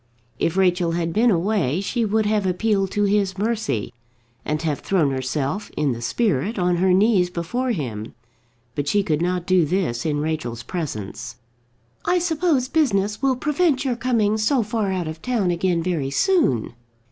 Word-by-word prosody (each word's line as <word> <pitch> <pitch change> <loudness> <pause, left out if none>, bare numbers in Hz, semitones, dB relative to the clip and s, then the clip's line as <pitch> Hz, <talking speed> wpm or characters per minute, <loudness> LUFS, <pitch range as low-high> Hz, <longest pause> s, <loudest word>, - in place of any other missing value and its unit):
If 165 +3 0
Rachel 180 -3 +2
had 165 -1 -1
been 235 +4 +4
away, 185 - +1
she 230 +4 -1
would 215 +1 +1
have 210 -2 +1
appealed 195 +1 +1
to 205 +2 0
his 200 -2 +1
mercy, 215 - -1 0.5
and 150 0 -1
have 150 -3 -1
thrown 165 -8 +1
herself, 135 +8 -2
in 150 -2 +1
the 120 -1 -4
spirit, 195 - 0
on 180 -1 +1
her 185 +1 +3
knees 190 -1 +4
before 235 +10 -2
him. 120 - -4 0.6
But 145 +1 -3
she 205 +7 +2
could 155 -4 0
not 180 0 -1
do 185 -2 +4
this 155 -8 -1
in 150 -2 0
Rachel's 150 -7 -3
presence. 120 - -5 0.7
"I 360 - +2
suppose 325 -6 +1
business 215 -9 +1
will 270 -1 +2
prevent 295 0 +1
your 255 -2 0
coming 225 -3 +1
so 240 +3 +2
far 210 -2 -1
out 180 -3 -2
of 160 0 -7
town 225 -8 0
again 175 -1 0
very 165 -6 -1
soon." 140 - +1
185 Hz, 170 wpm, -22 LUFS, 155-220 Hz, 0.7 s, been